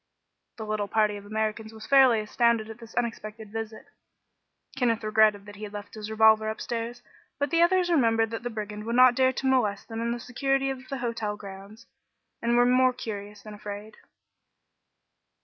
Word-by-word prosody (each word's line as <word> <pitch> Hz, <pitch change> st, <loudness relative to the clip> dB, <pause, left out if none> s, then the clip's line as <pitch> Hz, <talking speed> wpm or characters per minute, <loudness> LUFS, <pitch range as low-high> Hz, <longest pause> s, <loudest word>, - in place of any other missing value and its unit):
The 220 Hz, -, -6 dB
little 215 Hz, -1 st, -2 dB
party 210 Hz, 0 st, +1 dB
of 200 Hz, 0 st, -12 dB
Americans 220 Hz, +1 st, -2 dB
was 220 Hz, -1 st, -10 dB
fairly 260 Hz, -5 st, +5 dB
astounded 230 Hz, +1 st, +1 dB
by 220 Hz, -, -7 dB
this 230 Hz, 0 st, -14 dB
unexpected 220 Hz, -2 st, -4 dB
visit. 225 Hz, 0 st, -6 dB, 0.9 s
Kenneth 235 Hz, -4 st, +1 dB
regretted 215 Hz, -1 st, +3 dB
that 205 Hz, 0 st, -11 dB
he 215 Hz, -, -9 dB
had 210 Hz, -1 st, -7 dB
left 205 Hz, -1 st, -8 dB
his 215 Hz, -1 st, -7 dB
revolver 220 Hz, 0 st, +4 dB
upstairs, 235 Hz, +2 st, -4 dB, 0.3 s
but 285 Hz, -1 st, -1 dB
the 335 Hz, -, +3 dB
others 355 Hz, 0 st, +3 dB
remembered 225 Hz, -7 st, +3 dB
that 225 Hz, -, -4 dB
the 245 Hz, -, -4 dB
brigand 210 Hz, -1 st, -6 dB
would 230 Hz, +1 st, -2 dB
not 255 Hz, 0 st, +7 dB
dare 260 Hz, +1 st, +3 dB
to 265 Hz, -, -5 dB
molest 245 Hz, -7 st, +1 dB
them 225 Hz, 0 st, -4 dB
in 235 Hz, 0 st, -1 dB
the 240 Hz, -, -3 dB
security 270 Hz, +2 st, 0 dB
of 255 Hz, -1 st, -9 dB
the 275 Hz, -, -3 dB
hotel 230 Hz, -4 st, -3 dB
grounds, 200 Hz, +2 st, -11 dB, 0.6 s
and 235 Hz, +1 st, +2 dB
were 245 Hz, -, +5 dB
more 255 Hz, +1 st, +4 dB
curious 205 Hz, -3 st, -7 dB
than 215 Hz, -, -9 dB
afraid. 205 Hz, +1 st, -8 dB
225 Hz, 185 wpm, -27 LUFS, 215-245 Hz, 0.9 s, not